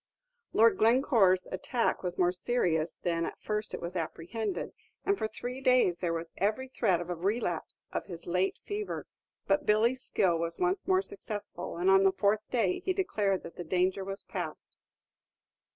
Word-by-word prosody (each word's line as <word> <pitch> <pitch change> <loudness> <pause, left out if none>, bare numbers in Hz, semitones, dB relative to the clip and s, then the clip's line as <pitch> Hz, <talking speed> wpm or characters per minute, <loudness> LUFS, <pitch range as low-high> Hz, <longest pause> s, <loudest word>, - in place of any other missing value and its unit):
Lord 230 +1 +5
Glencore's 220 -5 +4
attack 230 +6 0
was 180 -1 -3
more 180 -1 +3
serious 180 -5 0
than 170 -2 0
at - - -5
first 210 0 -2
it - - -6
was 175 +2 -5
apprehended, 175 +6 -3 0.3
and 400 - +3
for 220 - -2
three 245 +4 -6
days 250 -10 +4
there 175 -2 0
was 165 0 -4
every 215 +6 0
threat 210 -9 +1
of 175 0 -5
a - - -1
relapse 180 -1 -2
of - - -3
his 170 -3 -8
late 180 +2 0
fever; 415 0 -4 0.4
but 295 0 +1
Billy's 230 +5 +3
skill 175 -9 +1
was 165 0 0
once 365 +1 0
more 375 0 +3
successful, 215 - -6
and 180 +2 +3
on 195 0 +6
the 195 - +5
fourth 205 +2 +2
day 215 -8 +1
he 375 - -1
declared 205 - 0
that 170 - -10
the 175 - -4
danger 185 +3 +1
was 195 +1 -5
past. - - -6
195 Hz, 175 wpm, -30 LUFS, 180-245 Hz, 0.4 s, on